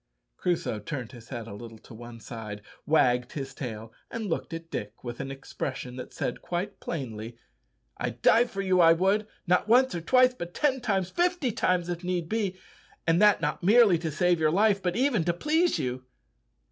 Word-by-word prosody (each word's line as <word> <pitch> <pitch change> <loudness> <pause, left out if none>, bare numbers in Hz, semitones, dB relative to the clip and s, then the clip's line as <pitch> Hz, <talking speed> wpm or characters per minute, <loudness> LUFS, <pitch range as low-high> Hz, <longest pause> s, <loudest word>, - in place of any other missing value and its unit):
Crusoe 175 -11 -1
turned 120 +2 -5
his 115 -3 -13
head 120 -4 -5
a 115 - -9
little 115 +2 -9
to 110 - -15
one 120 +1 -10
side, 105 -3 -8 0.2
wagged 125 -5 +3
his 135 -2 -5
tail, 115 -4 -7 0.2
and 230 -1 -4
looked 175 -3 -3
at 165 0 -7
Dick 105 +2 -6
with 120 -1 -6
an 140 - -4
expression 135 -1 -5
that 125 - -7
said 120 - -3
quite 180 +4 -4
plainly, 115 -6 -5 0.6
"I'd 120 0 -4
die 235 +2 +6
for 195 -4 -4
you, 185 -1 +2
I 165 0 +7
would 195 +5 +1 0.2
not 180 +3 +2
once, 255 +4 +5
or 170 - -3
twice, 255 +7 +4
but 175 -7 -8
ten 265 -3 +1
times, 190 -5 0
fifty 350 -7 +1
times 180 -4 +1
if 175 0 -4
need 175 -2 -2
be 205 -4 -1 0.5
and 165 +3 +3
that 210 -3 +5
not 150 -1 -1
merely 205 -2 +5
to 165 -1 -3
save 175 +3 +2
your 155 -1 +3
life, 200 +3 +3
but 180 -2 -1
even 250 -7 +2
to 175 - +2
please 320 - +1
you." 125 0 -3
170 Hz, 195 wpm, -27 LUFS, 125-205 Hz, 0.6 s, I